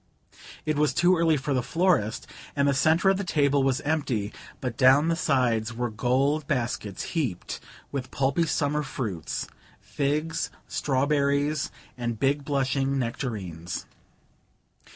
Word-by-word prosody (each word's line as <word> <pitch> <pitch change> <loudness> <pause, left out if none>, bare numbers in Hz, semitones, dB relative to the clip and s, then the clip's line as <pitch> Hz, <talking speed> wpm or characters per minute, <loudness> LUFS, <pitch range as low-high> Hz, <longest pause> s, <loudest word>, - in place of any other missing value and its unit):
It 155 -1 0
was 150 -1 +2
too 180 +1 +5
early 165 -2 +3
for 140 +1 -2
the 130 - +2
florist, 165 - +1 0.3
and 140 -1 +2
the 140 - +3
centre 160 +7 +4
of 195 - +1
the 200 - -2
table 145 -5 +2
was 135 -1 +1
empty, 135 -9 -1 0.3
but 125 -4 -3
down 135 +5 +5
the 165 - +2
sides 120 -6 +1
were 120 0 -2
gold 135 +6 +1
baskets 120 -7 -2
heaped 135 - -2 0.3
with 135 -3 -4
pulpy 140 +5 +1
summer 150 0 +1
fruits 105 - -4 0.3
figs, 150 +3 -1 0.2
strawberries 140 +1 +1 0.3
and 120 -2 -2
big 140 +3 +1
blushing 135 -1 0
nectarines. 105 - -4
140 Hz, 130 wpm, -26 LUFS, 125-150 Hz, 0.3 s, too